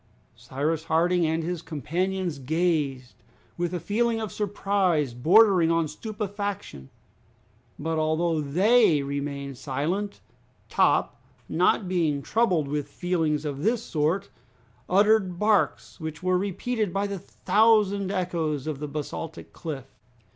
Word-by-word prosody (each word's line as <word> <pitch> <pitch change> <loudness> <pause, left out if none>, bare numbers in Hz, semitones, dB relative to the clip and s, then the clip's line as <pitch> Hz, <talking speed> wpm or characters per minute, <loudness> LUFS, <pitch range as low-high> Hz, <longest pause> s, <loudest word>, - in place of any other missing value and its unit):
Cyrus 155 +4 -2
Harding 170 +1 +2
and 160 +1 0
his 175 0 -3
companions 170 +2 -2
gazed, 145 -3 -1 0.4
with 175 0 -2
a 180 - -2
feeling 225 +6 0
of 220 -3 -4
surprise 195 - 0
bordering 180 - +5
on 165 -1 +2
stupefaction. 200 - -5 0.9
But, 160 +1 -2
although 160 +1 +1
they 175 - +4
remained 140 -1 -4
silent, 155 +11 -2 0.5
Top, - - +2 0.3
not 195 - +2
being 160 -6 0
troubled 185 -10 +1
with 145 0 -3
feelings 160 -3 -1
of 140 -1 -4
this 225 +4 +1
sort, 165 +6 -1 0.6
uttered 200 -1 +3
barks 210 -1 +1
which 160 0 -6
were 185 0 +2
repeated 205 +2 -2
by 195 +3 0
the 200 -1 -4
thousand 205 -1 +2
echoes 165 -7 -1
of 155 -3 -3
the 150 - -4
basaltic 150 +2 -6
cliff. 145 -6 -6
170 Hz, 120 wpm, -26 LUFS, 150-200 Hz, 0.9 s, bordering